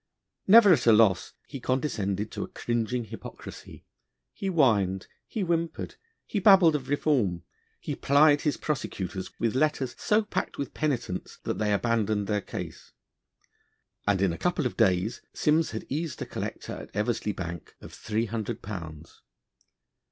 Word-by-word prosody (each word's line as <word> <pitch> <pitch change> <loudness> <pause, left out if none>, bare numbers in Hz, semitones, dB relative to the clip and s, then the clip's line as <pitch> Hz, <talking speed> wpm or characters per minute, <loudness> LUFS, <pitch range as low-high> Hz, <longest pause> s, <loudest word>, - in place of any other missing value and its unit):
Never 205 -1 +9
at 125 -6 +1
a - - +9
loss, 105 -4 +4
he 135 - -7
condescended 110 -6 -1
to - - -5
a - - -3
cringing 120 +1 -2
hypocrisy: 110 - -10 0.5
he 195 - -5
whined, 105 - +2 0.2
he 220 - -4
whimpered, 170 -1 -2 0.3
he 210 - -2
babbled 190 -5 +7
of 135 -3 -4
reform, 125 - +1 0.4
he - - -4
plied 145 +1 +4
his 150 - 0
prosecutors 95 - -3
with 115 -2 +1
letters 135 -2 +1
so 215 +1 +2
packed 210 - -3
with 140 - -4
penitence, 120 -11 -2
that - - -3
they 105 -1 +1
abandoned 110 -1 +1
their 105 0 0
case, - - -8 1.1
and 100 -2 +2
in 95 -4 +2
a - - -7
couple 175 -5 0
of 125 - -2
days 100 -1 +1
Simms 155 +2 +2
had 110 - -6
eased 155 +3 -3
a - - -7
collector - - -5
at - - -9
Eversey 105 0 0
Bank 85 -2 -6
of - - -12
three 110 +1 -2
hundred 110 -2 -4
pounds. 80 -6 -8
115 Hz, 150 wpm, -27 LUFS, 100-150 Hz, 1.1 s, Never